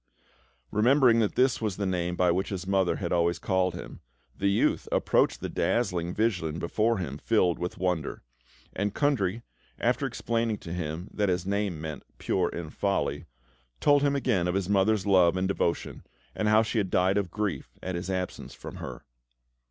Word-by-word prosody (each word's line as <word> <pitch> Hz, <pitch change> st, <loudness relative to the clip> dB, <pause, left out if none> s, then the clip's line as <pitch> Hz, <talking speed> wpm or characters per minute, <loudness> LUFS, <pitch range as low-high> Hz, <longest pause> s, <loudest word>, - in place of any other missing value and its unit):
Remembering 120 Hz, +1 st, +4 dB
that 110 Hz, -3 st, +1 dB
this 125 Hz, -1 st, +2 dB
was 105 Hz, -4 st, -2 dB
the 100 Hz, -, -1 dB
name 90 Hz, -2 st, -1 dB
by 90 Hz, -1 st, +3 dB
which 95 Hz, +3 st, -1 dB
his 95 Hz, -3 st, -4 dB
mother 95 Hz, -2 st, +2 dB
had 85 Hz, -, -4 dB
always 85 Hz, 0 st, +2 dB
called 90 Hz, -1 st, 0 dB
him, -, -, -8 dB, 0.4 s
the 100 Hz, -, 0 dB
youth 100 Hz, -, +1 dB
approached -, -, +2 dB
the -, -, -2 dB
dazzling 90 Hz, -7 st, 0 dB
vision 90 Hz, -7 st, 0 dB
before 110 Hz, +7 st, +1 dB
him, 75 Hz, -6 st, -4 dB
filled 90 Hz, -5 st, +2 dB
with 90 Hz, +1 st, -4 dB
wonder; 90 Hz, -8 st, -2 dB, 0.5 s
and 100 Hz, 0 st, -2 dB
Kundry, 115 Hz, -7 st, +1 dB, 0.3 s
after -, -, +1 dB
explaining 115 Hz, -2 st, -1 dB
to 85 Hz, -, -8 dB
him 85 Hz, +1 st, -4 dB
that 105 Hz, -2 st, +1 dB
his 90 Hz, 0 st, 0 dB
name 100 Hz, -4 st, -1 dB
meant 80 Hz, -1 st, -5 dB, 0.2 s
"Pure -, -, 0 dB
in 85 Hz, -3 st, -6 dB
Folly," 85 Hz, -6 st, -1 dB, 0.5 s
told 145 Hz, -1 st, +4 dB
him 140 Hz, 0 st, +2 dB
again 115 Hz, -10 st, +1 dB
of 90 Hz, -, -1 dB
his 95 Hz, -2 st, 0 dB
mother's 100 Hz, +1 st, +2 dB
love 95 Hz, -3 st, +4 dB
and 95 Hz, +1 st, +1 dB
devotion, 85 Hz, -3 st, -2 dB, 0.3 s
and 105 Hz, -, -1 dB
how 110 Hz, +1 st, +5 dB
she 115 Hz, +1 st, -1 dB
had 100 Hz, -3 st, -1 dB
died 95 Hz, +3 st, +3 dB
of 95 Hz, -3 st, -3 dB
grief 105 Hz, +1 st, -3 dB
at 95 Hz, -, -3 dB
his 85 Hz, +1 st, -4 dB
absence 90 Hz, -1 st, -4 dB
from -, -, -9 dB
her. -, -, -7 dB
95 Hz, 180 wpm, -28 LUFS, 90-105 Hz, 0.5 s, how